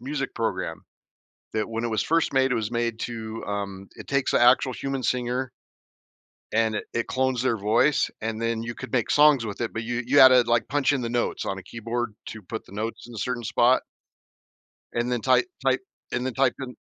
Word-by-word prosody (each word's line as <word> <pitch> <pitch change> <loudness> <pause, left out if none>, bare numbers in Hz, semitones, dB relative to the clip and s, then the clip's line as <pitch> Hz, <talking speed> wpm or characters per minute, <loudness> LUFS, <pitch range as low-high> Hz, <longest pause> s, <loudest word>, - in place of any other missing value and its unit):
music 135 +1 -4
program 95 -7 -3 0.7
that 110 -1 -1
when 115 0 -3
it 120 - 0
was 110 -1 0
first 165 0 +1
made, 130 -1 +3
it - - +2
was 110 0 -2
made 120 -1 -1
to, 115 -1 -5
um 100 -1 -4
it - - -11
takes 140 -1 +1
the - - +3
actual 125 +1 +5
human 135 0 -3
singer 125 +1 -1 1.0
and 110 -1 +2
it - - -3
it 115 - -1
clones 130 -2 0
their 125 -3 +1
voice, 110 +8 +2
and 110 0 -3
then 115 0 -1
you 120 +1 -5
could 130 -1 -9
make 120 -4 +1
songs 145 -5 +5
with 105 +1 -6
it, 115 - -2
but 110 - -3
you 120 +1 -2
you 140 +3 +3
had 130 - +11
to, 125 -1 +6
like, 120 0 +1
punch 145 0 +2
in 135 - 0
the 115 - -2
notes 120 0 -1
on 95 - -2
a 95 - -8
keyboard 115 +2 -4
to 110 -2 -8
put 110 +5 -6
the - - -16
notes 110 +3 -4
in 120 - -11
a - - -6
certain 125 +2 -2
spot 120 +3 +3 1.1
and 120 +1 -1
then 120 -2 0
type 365 - +3 0.2
type - - +3 0.3
and 125 - -1
then 130 - -3
type 135 -2 +2
in 125 -2 -6
120 Hz, 220 wpm, -25 LUFS, 110-130 Hz, 1.1 s, had